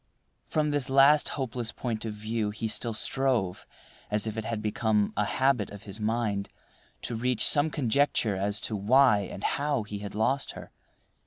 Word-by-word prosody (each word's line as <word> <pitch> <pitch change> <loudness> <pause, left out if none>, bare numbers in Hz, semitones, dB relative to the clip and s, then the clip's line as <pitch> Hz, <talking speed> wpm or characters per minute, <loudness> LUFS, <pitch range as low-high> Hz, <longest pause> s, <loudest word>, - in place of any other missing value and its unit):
From 150 -1 0
this 145 -2 0
last 140 +3 +5
hopeless 125 -3 -3
point 115 -3 -4
of 110 -2 -4
view 110 0 -2
he 110 +2 -4
still 115 +1 -1
strove, 125 -7 0 0.4
as 105 +1 0
if 110 -1 -4
it 110 -1 -4
had 115 -1 -2
become 105 -1 0
a 105 - +1
habit 130 -5 +1
of 100 0 -11
his 105 +1 -7
mind, 105 -2 -1 0.5
to - - -4
reach 125 +1 +2
some 145 +1 +4
conjecture 135 -6 +1
as 100 +2 -1
to 110 - -3
why 120 +2 +4
and 100 0 -7
how 145 -4 0
he 105 -1 -6
had 100 0 -7
lost 130 +6 0
her. - - -11
110 Hz, 175 wpm, -28 LUFS, 105-135 Hz, 0.5 s, last